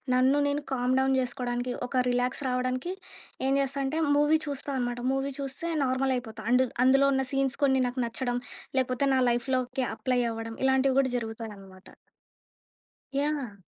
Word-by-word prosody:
నన్ను 260 Hz, +3 st, +4 dB
నేను 285 Hz, +1 st, -1 dB
కామ్‌డౌన్ 265 Hz, +1 st, +2 dB
జెసుకోవడానికి, 245 Hz, -1 st, -2 dB
ఒక 255 Hz, 0 st, +1 dB
రిలాక్స్ 245 Hz, +3 st, 0 dB
రావడానికి, 255 Hz, +6 st, -1 dB, 0.5 s
ఏం 270 Hz, -, +2 dB
జెస్తా 275 Hz, 0 st, -2 dB
అంటే, 300 Hz, +4 st, -1 dB, 0.2 s
మూవీ 295 Hz, +2 st, +4 dB
చూస్తా 285 Hz, 0 st, -4 dB
అనమాట. 245 Hz, -1 st, -2 dB
మూవీ 270 Hz, +1 st, -1 dB
చూస్తే 275 Hz, +4 st, -4 dB, 0.2 s
నార్మల్ 260 Hz, +1 st, +1 dB
అయిపోతా. 225 Hz, -3 st, -7 dB
అండ్ 255 Hz, +1 st, +5 dB, 0.2 s
అందులో 270 Hz, +2 st, +5 dB
ఉన్న 265 Hz, 0 st, +1 dB
సీన్స్ 270 Hz, -1 st, 0 dB
కొన్ని 265 Hz, -1 st, +3 dB
నాకు 250 Hz, +1 st, -3 dB
నచ్చడం. 245 Hz, +1 st, -2 dB, 0.4 s
లేపోతే 255 Hz, +1 st, 0 dB
నా -, -, +3 dB
లైఫ్‌లోకి 255 Hz, +2 st, 0 dB
అప్లై 250 Hz, +1 st, 0 dB
అవ్వడం. 225 Hz, 0 st, -5 dB
ఇలాంటివి 265 Hz, 0 st, +3 dB
కూడా 260 Hz, -2 st, +2 dB
జరుగుతాయి 225 Hz, -1 st, -5 dB
అనమాట. 190 Hz, -1 st, -15 dB, 1.3 s
యాహ్! 285 Hz, -7 st, -2 dB
260 Hz, 150 wpm, -28 LUFS, 245-270 Hz, 1.3 s, అండ్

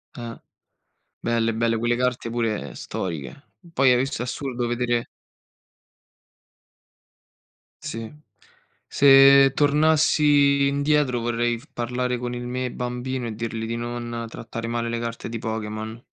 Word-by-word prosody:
Eh! 115 Hz, -1 st, -7 dB, 0.9 s
Belle, 115 Hz, -1 st, +1 dB
belle, 115 Hz, 0 st, +1 dB
Quelle 120 Hz, +1 st, +1 dB
carte 125 Hz, -1 st, -1 dB
pure 110 Hz, -, -2 dB
storiche. 85 Hz, -, -6 dB, 0.2 s
Poi 135 Hz, -5 st, +4 dB
hai -, -, +4 dB
visto, 135 Hz, -1 st, -2 dB
è -, -, -2 dB
assurdo 125 Hz, -1 st, -3 dB
vedere 120 Hz, 0 st, 0 dB, 2.8 s
Sì, 115 Hz, -1 st, -5 dB, 0.8 s
se 135 Hz, 0 st, +7 dB
tornassi 145 Hz, -1 st, +4 dB
indietro 140 Hz, -2 st, +1 dB
vorrei 120 Hz, 0 st, -1 dB
f -, -, -18 dB
parlare 125 Hz, +1 st, -2 dB
con 120 Hz, 0 st, -4 dB
il 120 Hz, 0 st, -5 dB
me 125 Hz, 0 st, -3 dB
bambino 125 Hz, 0 st, -4 dB
e 110 Hz, -, -5 dB
dirli 115 Hz, 0 st, -4 dB
di 115 Hz, -, -3 dB
non 120 Hz, 0 st, -4 dB
trattare 115 Hz, 0 st, -6 dB
male 115 Hz, 0 st, -2 dB
le 115 Hz, 0 st, -2 dB
carte 115 Hz, 0 st, -5 dB
di 115 Hz, 0 st, -4 dB
Pokémon. 110 Hz, 0 st, -5 dB
120 Hz, 125 wpm, -24 LUFS, 115-130 Hz, 2.8 s, se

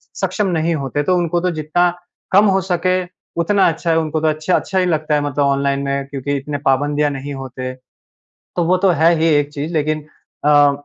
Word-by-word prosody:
सक्षम 210 Hz, -2 st, -1 dB
नहीं 165 Hz, 0 st, 0 dB
होते 145 Hz, 0 st, -2 dB
तो 180 Hz, +4 st, +2 dB
उनको 175 Hz, 0 st, 0 dB
तो 180 Hz, -, +1 dB
जितना 160 Hz, +3 st, +1 dB, 0.4 s
कम 200 Hz, +3 st, +6 dB
हो 195 Hz, -1 st, +3 dB
सके 185 Hz, -1 st, 0 dB, 0.5 s
उतना 195 Hz, +3 st, +3 dB
अच्छा 165 Hz, +1 st, -3 dB
है। 160 Hz, -, +3 dB
उनको 155 Hz, 0 st, -1 dB
तो 160 Hz, -, +2 dB
अच्छा 155 Hz, +4 st, +1 dB
अच्छा 190 Hz, -, 0 dB
ही 185 Hz, -, +2 dB
लगता 155 Hz, -3 st, 0 dB
है 145 Hz, -, +1 dB
मतलब 145 Hz, 0 st, -1 dB
ऑनलाइन 140 Hz, 0 st, +1 dB
में 140 Hz, 0 st, -2 dB
क्योंकि 140 Hz, 0 st, -3 dB
इतने 145 Hz, +1 st, -4 dB
पाबंदियाँ 145 Hz, +2 st, +2 dB
नहीं 140 Hz, +1 st, -6 dB
होते। 130 Hz, -1 st, -6 dB, 0.8 s
तो 175 Hz, -, +1 dB
वो 185 Hz, +2 st, +3 dB
तो 190 Hz, 0 st, +2 dB
है 165 Hz, +1 st, +6 dB
ही 165 Hz, -, +3 dB
एक 145 Hz, 0 st, +1 dB
चीज़ 150 Hz, +4 st, -4 dB
लेकिन 155 Hz, 0 st, 0 dB, 0.4 s
अ, 145 Hz, -1 st, +6 dB
155 Hz, 205 wpm, -18 LUFS, 145-175 Hz, 0.8 s, कम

